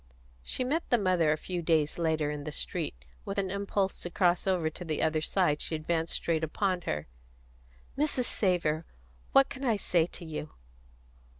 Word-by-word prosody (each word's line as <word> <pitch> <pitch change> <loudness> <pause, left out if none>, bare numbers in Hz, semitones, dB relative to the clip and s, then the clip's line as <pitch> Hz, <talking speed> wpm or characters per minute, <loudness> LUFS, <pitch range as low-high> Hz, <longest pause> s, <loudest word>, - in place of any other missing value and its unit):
She 155 - -1
met 300 +7 -1
the 245 - +5
mother, 180 -6 +3
a 155 - +1
few 180 +2 -3
days 160 -1 +2
after, 160 -3 +1
in 145 -1 -5
the 150 - -4
street; 145 - -2 0.3
with 195 - -5
an 190 -2 0
impulse 200 -1 -1
to 175 - -5
cross 175 +1 +2
over 180 -4 +2
to 160 +3 -5
the 155 -3 -2
other 155 0 +2
side 155 -3 +2
she 160 - -1
advanced 160 +1 -1
straight 165 -1 0
upon 185 +3 0
her. 75 0 -1 0.9
"Mrs. 285 -3 +1
Savor! 170 -7 +1 0.5
What 275 0 +6
can 265 - -7
I 230 -5 +2
say 170 -4 +2
to 175 - -10
you?" 155 -1 -6
170 Hz, 180 wpm, -30 LUFS, 155-195 Hz, 0.9 s, What